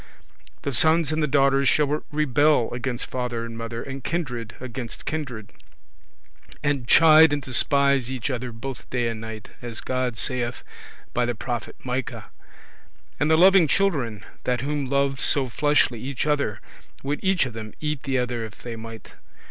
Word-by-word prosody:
The 140 - -1
Sons 160 +5 +5
and 155 0 0
the 150 - +2
daughters 135 -1 +3
shall 150 0 +2
rebel 150 -3 +2
against 120 0 -2
father 120 -2 -3
and 115 -1 -8
mother, 115 0 -5
and 135 -1 -7
kindred 125 -10 -3
against 125 -2 -7
kindred, 130 -10 -5 1.1
and 140 -4 0
chide 160 +1 +7
and 145 - 0
despise 140 0 +2
each 130 +1 -3
other, 125 -1 -4
both 120 +3 -8
day 120 -2 0
and 110 -1 -5
night, 110 -1 -8
as 120 -2 -3
God 130 -2 -2
saith 120 0 -1 0.5
by 120 0 +1
the 120 - -1
prophet 120 0 -5
Micah. 125 0 -4 0.9
And 145 - +2
the 160 - +5
loving 185 -1 +6
children, 135 - 0 0.2
that 125 -2 0
whom 140 -1 -2
loved 140 0 +1
so 135 -3 +3
fleshly 145 -2 +2
each 135 0 -3
other, 145 -9 0 0.4
would 145 +2 -3
each 190 -5 +2
of 125 - -6
them 110 -2 -8
eat 150 -2 -2
the 135 -3 -1
other 125 -2 -2
if 110 0 -10
they 120 -1 -5
might. 115 0 -10
130 Hz, 165 wpm, -24 LUFS, 120-145 Hz, 1.1 s, chide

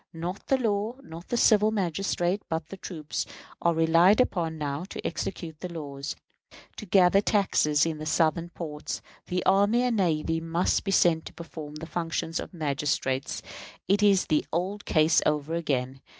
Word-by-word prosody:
Not 175 +4 -5
the 270 - +3
law, 220 -1 -1
not 165 -4 -10
the 240 - -1
civil 215 -2 +5
magistrate, 190 -1 -1
but 160 -1 -1 0.2
troops, 155 -4 -4 0.3
are 170 -1 +2
relied 165 +6 +5
upon 170 -9 +1
now 145 +1 -3
to - - -8
execute 160 -5 -4
the 180 - -6
laws. 140 -4 -5 0.6
To 215 - -8
gather 185 +1 +5
taxes 165 -8 +2
in 160 -2 -3
the 155 - -5
Southern 165 +2 +1
ports, 150 -4 -6 0.2
the 180 0 -2
army 205 +5 +4
and 245 -3 +1
navy 165 -3 +1
must 165 +2 0
be - - -2
sent 170 -4 +3
to - - -9
perform 155 -3 -9
the 155 +1 -6
functions 165 0 -2
of - - -6
magistrates. 145 -4 -2 0.4
It 200 +2 +3
is 200 -2 +4
the 155 - +1
old 190 +5 -2
case 160 +1 +4
over 150 +1 0
again. 135 -5 -2
170 Hz, 165 wpm, -27 LUFS, 155-195 Hz, 0.6 s, civil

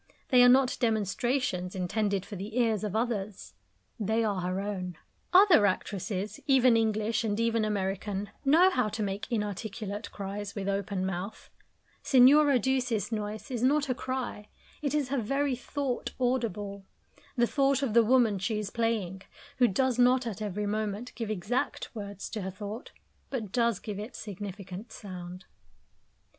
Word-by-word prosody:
They 250 -2 +6
are 245 - +8
not 260 0 +4
demonstrations 220 -3 0
intended 200 +1 -1
for 210 - -8
the 205 +5 -6
ears 225 -4 +2
of 210 -1 -3
others; 210 - -2 0.5
they 220 +2 +1
are 200 -4 0
her 185 +2 -2
own. 185 -4 -4 0.3
Other 360 - +7
actresses, 195 +1 -3
even 255 -3 +5
English, 220 0 +1
and 210 -1 -1
even 230 -1 +2
American, 200 0 -2
know 330 +7 +6
how 250 -9 +1
to 215 +1 -3
make 200 +2 -4
inarticulate 210 0 -3
cries, 200 +1 -5
with 200 -2 -3
open 195 -1 -1
mouth; 190 +3 -5 0.5
Signora 275 +2 +6
Duse's 250 -4 0
noise 215 +3 -4
is 240 -3 -2
not 280 +2 +2
a - - +3
cry; 250 -5 -4 0.3
it 295 -1 -1
is 285 -4 0
her 275 -1 0
very 275 +4 0
thought 260 0 -3
audible 210 -6 -1 0.5
the 240 -2 +4
thought 275 +1 +2
of 240 -6 0
the 235 - +7
woman 225 -4 +3
she 210 +4 -1
is 210 -1 -4
playing, 215 -5 -1 0.4
who 245 - +6
does 250 +4 +1
not 250 +1 +4
at 220 -2 -5
every 210 0 -2
moment 215 +2 -3
give 225 -1 -4
exact 215 +5 -2
words 200 -3 -6
to 215 - -3
her 190 - -3
thought, 205 +5 -7 0.4
but 225 -8 -4
does 235 -3 +2
give 205 0 -6
it 215 +4 -7
significant 200 +1 -7
sound. 185 -3 -8
215 Hz, 155 wpm, -29 LUFS, 200-245 Hz, 0.5 s, are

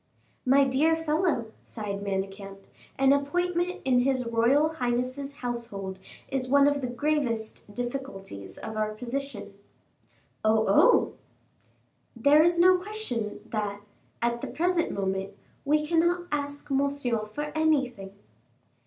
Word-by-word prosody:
"My 275 +2 +6
dear 280 +5 +3
fellow," 310 -7 0
sighed 205 -3 -5
Manicamp, 195 0 -4 0.3
"an 270 0 +5
appointment 355 +5 0
in 255 -2 +4
his 255 0 +1
royal 235 +7 +3
highness's 255 -1 -2
household 230 -7 -5 0.3
is 260 -1 -2
one 280 +2 +5
of 285 -1 +1
the 250 - -2
gravest 245 -6 -2
difficulties 240 - -6
of 220 - -7
our 215 0 -1
position." 245 -3 -5 0.9
"Oh! 220 0 +3
oh!" 340 - +5 1.0
"There 285 +6 +5
is 340 +2 +4
no 365 +1 +6
question 360 - -4
that, 205 -2 -3 0.4
at 235 0 0
the - - -4
present 350 +1 +1
moment, 195 0 -2 0.3
we 300 +1 +2
cannot 345 +2 +2
ask 285 -1 -3
Monsieur 275 -5 0
for 295 +8 -5
anything." 270 -11 +1
260 Hz, 120 wpm, -27 LUFS, 215-300 Hz, 1.0 s, My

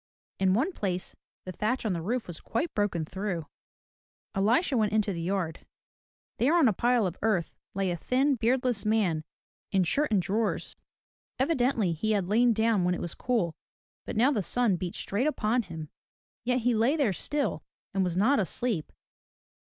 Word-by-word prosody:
In 190 0 +3
one 285 - +1
place 185 - -3 0.3
the 185 - -5
thatch 220 +7 -1
on 210 - +1
the 170 - -3
roof 230 +7 -2
was 175 -3 -4
quite 275 +9 -2
broken 195 -6 0
through. 185 -2 -3 0.9
Elisha 235 - +2
went 215 -3 +1
into 215 -2 +1
the 170 - -4
yard. 170 -2 -2 0.7
There 275 +8 +3
on 320 -6 +5
a 220 - +3
pile 240 +2 +2
of 180 -1 -3
earth, 195 -7 0 0.2
lay 195 -2 0
a 175 - -2
thin, 265 - +2
beardless 245 -2 +1
man 205 -8 +1 0.5
in 190 -1 +3
shirt 285 - +1
and 205 - +4
drawers. 205 +5 -1 0.6
Evidently 255 - +1
he 215 +7 0
had 200 -3 +1
lain 235 +3 +4
down 220 -3 +2
when 180 0 +2
it - - -5
was 175 - -3
cool, 220 -10 -1 0.5
but - - -4
now 250 +6 +5
the 220 - 0
sun 230 +1 +2
beat 175 0 -4
straight 220 +9 -1
upon 240 -4 +1
him. 165 -6 -7 0.6
Yet 250 +1 +1
he 245 +1 +2
lay 230 +7 +3
there 275 -11 +2
still, 290 - -2 0.3
and 195 - +2
was 180 -1 -1
not 265 +9 +4
asleep. 195 -1 -1
215 Hz, 175 wpm, -28 LUFS, 185-245 Hz, 0.9 s, on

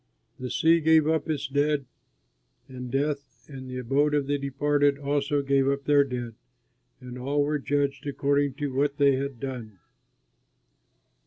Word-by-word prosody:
The 130 0 -5
sea 165 +5 +3
gave 160 -1 +4
up 160 0 0
its 145 -2 -1
dead, 145 +1 0 0.8
and 125 -1 -8
Death 140 +2 -3
and 130 -3 -9
the 130 - -5
Abode 140 +4 +1
of 145 -2 +1
the 145 +1 -1
Departed 145 +1 +1
also 140 0 0
gave 135 -1 +2
up 140 0 0
their 145 -1 +4
dead, 125 -4 -5 0.7
and 125 0 -9
all 140 +3 0
were 150 +1 -1
judged 140 0 -1
according 140 0 0
to 145 -2 -3
what 140 +1 0
they 140 -2 +4
had 135 -2 -4
done. 120 -6 -6
140 Hz, 155 wpm, -26 LUFS, 135-145 Hz, 0.8 s, gave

